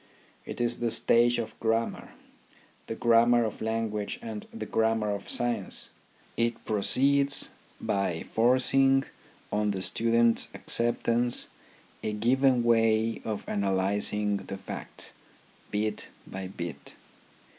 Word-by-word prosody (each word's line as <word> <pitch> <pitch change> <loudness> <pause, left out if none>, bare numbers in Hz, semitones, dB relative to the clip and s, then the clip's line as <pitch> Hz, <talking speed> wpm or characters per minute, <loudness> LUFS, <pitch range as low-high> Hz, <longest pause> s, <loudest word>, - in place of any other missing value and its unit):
It - - -6
is 120 0 +1
the 120 - 0
stage 120 +1 +3
of 110 -2 -4
grammar, 115 0 -2 0.7
the 115 - -4
grammar 120 +1 +4
of 110 - -6
lan 110 0 -1
guage 105 - -4
and 225 -2 -7
the 230 - -6
grammar 110 -1 0
of 100 -1 -5
science. 120 -5 -1 0.5
It 115 0 -1
proceeds 140 +7 +3 0.3
by 95 -4 -2
forcing 135 +3 +3 0.5
on 105 0 0
the 95 -2 -2
students' 115 +2 +3
acceptance 120 0 +1 0.5
a 110 - -3
given 125 +3 +2
way 115 -1 +2
of 110 -2 -5
analysing 100 +1 0
the 95 0 -7
facts, - - -3 0.6
bit 105 +1 -2 0.2
by 95 0 -7
bit. 85 -3 -8
115 Hz, 115 wpm, -28 LUFS, 105-120 Hz, 0.7 s, grammar